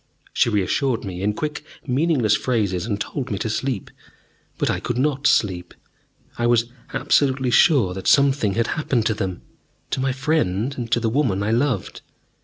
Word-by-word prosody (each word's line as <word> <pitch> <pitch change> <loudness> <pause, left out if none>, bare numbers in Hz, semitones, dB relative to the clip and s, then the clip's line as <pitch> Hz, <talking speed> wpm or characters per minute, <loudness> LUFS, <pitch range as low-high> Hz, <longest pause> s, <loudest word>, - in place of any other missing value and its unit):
She - - +3
reassured 115 +4 0
me 90 -2 -6
in 105 +1 0
quick 150 +2 -4 0.2
meaningless 130 -5 +2
phrases, 105 -7 -1
and 105 -3 -2
told 130 +4 -4
me 100 - -2
to 110 +3 -2
sleep. 125 -3 -3 0.7
But - - 0
I - - -2
could 120 - -3
not 140 +1 +1
sleep: 90 -4 +1 0.6
I 120 - +2
was 120 -1 +3 0.3
absolutely 130 -3 +1
sure 120 - +4
that 95 0 -6
something 135 -8 +3
had 115 0 +1
happened 130 -7 0
to 110 - +2
them, 95 -3 -4 0.5
to - - -1
my 135 0 +1
friend 135 - 0
and 120 -3 -5
to 120 - +3
the 115 - -1
woman 110 -5 +1
I 105 - 0
loved. 125 +3 -1
120 Hz, 175 wpm, -22 LUFS, 105-135 Hz, 0.7 s, sure